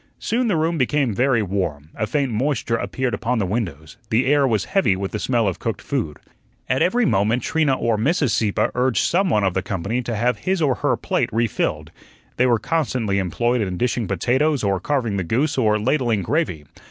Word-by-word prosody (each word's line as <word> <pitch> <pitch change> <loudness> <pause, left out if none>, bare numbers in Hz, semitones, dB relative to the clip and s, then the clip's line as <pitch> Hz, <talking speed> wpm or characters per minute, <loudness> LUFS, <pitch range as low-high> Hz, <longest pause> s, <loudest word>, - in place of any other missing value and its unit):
Soon 240 +2 -1
the 205 - +1
room 160 +1 0
became 135 -2 +1
very 125 0 +2
warm, 85 -6 -3
a 110 - -2
faint 140 -2 0
moisture 120 0 0
appeared 125 +2 -2
upon 120 +1 -1
the 105 - 0
windows, 90 -6 -4
the 115 +4 +2
air 140 0 +3
was 110 -5 0
heavy 190 - +2
with 95 +1 -4
the 105 - -3
smell 120 -3 +1
of 95 - -2
cooked - - -3
food. 75 -2 -3 0.5
At 130 - 0
every 235 +6 +2
moment 110 - +1
Trina 155 -4 +1
or 115 -2 0
Mrs. 145 +2 +1
Sieppe 105 -3 +1
urged 125 -1 +1
some 190 +2 +2
one 105 -8 +2
of 95 -2 +1
the 95 - 0
company 100 +7 -2
to 120 -2 -4
have 120 +3 0
his 190 0 -1
or 145 -5 +2
her - - 0
plate - - -1
refilled. 95 -9 -1 0.5
They 125 - +3
were 120 -2 +3
constantly 125 -9 -1
employed 120 +7 0
in 95 -3 -2
dishing 120 -1 -1
potatoes 140 +2 +1
or 100 -2 +1
carving 120 - -1
the 95 - -1
goose 135 - 0
or 110 -5 +2
ladling 120 -3 0
gravy. 110 - -1
120 Hz, 200 wpm, -21 LUFS, 100-140 Hz, 0.5 s, air